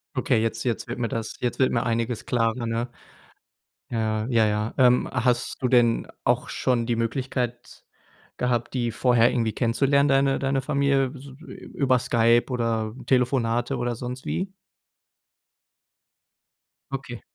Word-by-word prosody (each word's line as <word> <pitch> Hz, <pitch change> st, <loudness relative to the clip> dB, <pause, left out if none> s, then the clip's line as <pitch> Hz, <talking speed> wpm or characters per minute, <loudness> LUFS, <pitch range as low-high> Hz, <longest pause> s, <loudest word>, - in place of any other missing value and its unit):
Okay. 130 Hz, -3 st, +1 dB
Jetzt 115 Hz, 0 st, -2 dB
jetzt 120 Hz, -3 st, -2 dB
wird 115 Hz, -2 st, -3 dB
das 115 Hz, -1 st, -3 dB
jetzt 125 Hz, -, -2 dB
mir 130 Hz, -3 st, +2 dB
einiges 115 Hz, 0 st, -1 dB
klarer, 115 Hz, 0 st, 0 dB
ne. 115 Hz, +1 st, -2 dB, 1.0 s
Ja. 110 Hz, -2 st, -1 dB
Ja, 115 Hz, -3 st, +3 dB
ja. 105 Hz, +1 st, -1 dB
Ähm, 125 Hz, -1 st, +4 dB
hast 125 Hz, -1 st, 0 dB
du 125 Hz, -, +2 dB
denn 120 Hz, -2 st, +3 dB, 0.2 s
auch -, -, +1 dB
schon 120 Hz, -2 st, 0 dB
die 120 Hz, -1 st, 0 dB
Möglichkeit 120 Hz, +1 st, -3 dB, 0.5 s
gehabt, 120 Hz, 0 st, -1 dB
die 120 Hz, -2 st, 0 dB
vorher 120 Hz, -1 st, +3 dB
irgendwie 115 Hz, -3 st, 0 dB
kennenzulernen, 140 Hz, +4 st, +2 dB
deine 135 Hz, -1 st, +3 dB
deine 135 Hz, 0 st, 0 dB
Familie 140 Hz, -2 st, +1 dB
s 140 Hz, 0 st, -11 dB, 0.5 s
über 130 Hz, -3 st, +2 dB
Skype 120 Hz, -1 st, +3 dB
oder 115 Hz, -3 st, -1 dB
Telefonate 125 Hz, 0 st, +1 dB
oder 120 Hz, 0 st, -2 dB
sonst 125 Hz, +2 st, -7 dB
wie? 190 Hz, +1 st, -2 dB, 2.4 s
Okay. 135 Hz, -3 st, -6 dB
120 Hz, 130 wpm, -25 LUFS, 115-130 Hz, 2.4 s, Ähm